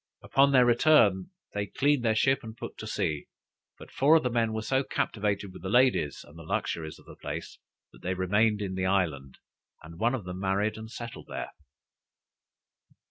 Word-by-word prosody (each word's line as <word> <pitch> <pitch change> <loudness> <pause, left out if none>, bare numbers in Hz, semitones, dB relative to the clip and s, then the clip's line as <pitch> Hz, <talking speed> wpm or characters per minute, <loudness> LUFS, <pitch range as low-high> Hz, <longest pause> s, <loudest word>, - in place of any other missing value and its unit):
Upon 140 +1 +4
their 130 -2 +6
return, 120 - +4 0.2
they 100 0 -2
cleaned 140 +4 +1
their 110 -2 +2
ship 135 +4 +3
and 110 -2 -10
put - - -7
to - - -6
sea, 75 -1 -2 0.5
but - - -13
four 145 +4 +4
of 160 - +4
the 125 - 0
men 115 -1 +1
were 110 0 -3
so 135 +4 +1
captivated 100 -5 -2
with - - -11
the 95 - -4
ladies 120 - +2
and 75 - -16
the - - -10
luxuries 80 0 -3
of - - -19
the - - -12
place, - - -7 0.3
that - - -18
they 95 +1 -2
remained 105 +3 +2
in 95 -2 -3
the 95 0 -1
island, 80 -9 -1 0.5
and 85 +1 -12
one 120 +3 +2
of 120 - -5
them 90 0 -6
married 100 +2 0
and 110 0 -8
settled 120 0 -8
there. - - -5
105 Hz, 190 wpm, -28 LUFS, 95-120 Hz, 0.5 s, their